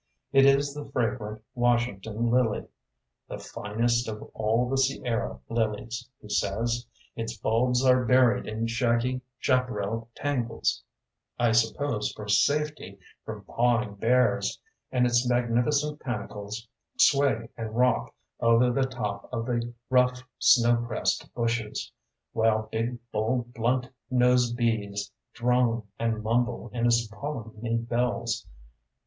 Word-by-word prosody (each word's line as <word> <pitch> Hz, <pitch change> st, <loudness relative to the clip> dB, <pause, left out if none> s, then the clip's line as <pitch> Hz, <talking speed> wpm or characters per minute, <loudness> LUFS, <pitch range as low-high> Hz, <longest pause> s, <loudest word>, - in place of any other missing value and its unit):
It 135 Hz, 0 st, +7 dB
is 140 Hz, +1 st, +3 dB
the 145 Hz, 0 st, -6 dB
fragrant 115 Hz, -4 st, -2 dB
Washington 120 Hz, -2 st, 0 dB
lily, 120 Hz, -3 st, +2 dB, 0.6 s
“the -, -, -6 dB
finest 120 Hz, +4 st, -1 dB
of 105 Hz, -1 st, -6 dB
all 110 Hz, +3 st, +1 dB
the 135 Hz, -, -1 dB
Sierra 130 Hz, -3 st, 0 dB
lilies,” 115 Hz, +2 st, -2 dB
he -, -, -13 dB
says. 115 Hz, +3 st, -1 dB, 0.3 s
“Its 115 Hz, 0 st, -4 dB
bulbs 125 Hz, +4 st, +1 dB
are 130 Hz, 0 st, +5 dB
buried 125 Hz, 0 st, +4 dB
in 110 Hz, +1 st, -2 dB
shaggy 120 Hz, +2 st, +1 dB, 0.2 s
chaparral 115 Hz, -3 st, 0 dB
tangles, 120 Hz, -, -1 dB, 0.5 s
I 120 Hz, -1 st, +3 dB
suppose 115 Hz, +1 st, +1 dB
for 105 Hz, -, -8 dB
safety 145 Hz, 0 st, +1 dB, 0.3 s
from 110 Hz, -2 st, -7 dB
pawing 120 Hz, 0 st, +1 dB
bears; 125 Hz, +5 st, +2 dB, 0.3 s
and 125 Hz, -1 st, +3 dB
its 120 Hz, 0 st, +2 dB
magnificent 125 Hz, +5 st, +1 dB
panicles 105 Hz, -1 st, -5 dB, 0.3 s
sway 140 Hz, -, +3 dB
and 115 Hz, -1 st, -5 dB
rock 125 Hz, +1 st, +2 dB, 0.3 s
over 115 Hz, +1 st, +4 dB
the 135 Hz, +1 st, +1 dB
top 115 Hz, -6 st, -4 dB
of 115 Hz, -2 st, -2 dB
the 120 Hz, -1 st, -1 dB, 0.2 s
rough 125 Hz, 0 st, +3 dB, 0.2 s
snow 120 Hz, -1 st, +5 dB
pressed 120 Hz, -2 st, -1 dB
bushes, 115 Hz, -2 st, -2 dB, 0.4 s
while 110 Hz, -1 st, +2 dB
big, 115 Hz, +2 st, -1 dB
bold, 120 Hz, +3 st, -1 dB
blunt 125 Hz, +2 st, 0 dB, 0.2 s
nosed 125 Hz, -1 st, +3 dB
bees 105 Hz, -4 st, -1 dB, 0.2 s
drone 120 Hz, -1 st, +1 dB, 0.2 s
and 115 Hz, -2 st, -1 dB
mumble 120 Hz, +1 st, 0 dB
in 120 Hz, 0 st, +1 dB
its 115 Hz, -1 st, +3 dB
polleny 115 Hz, -2 st, -4 dB
bells. 120 Hz, -2 st, -1 dB
120 Hz, 120 wpm, -27 LUFS, 110-125 Hz, 0.6 s, It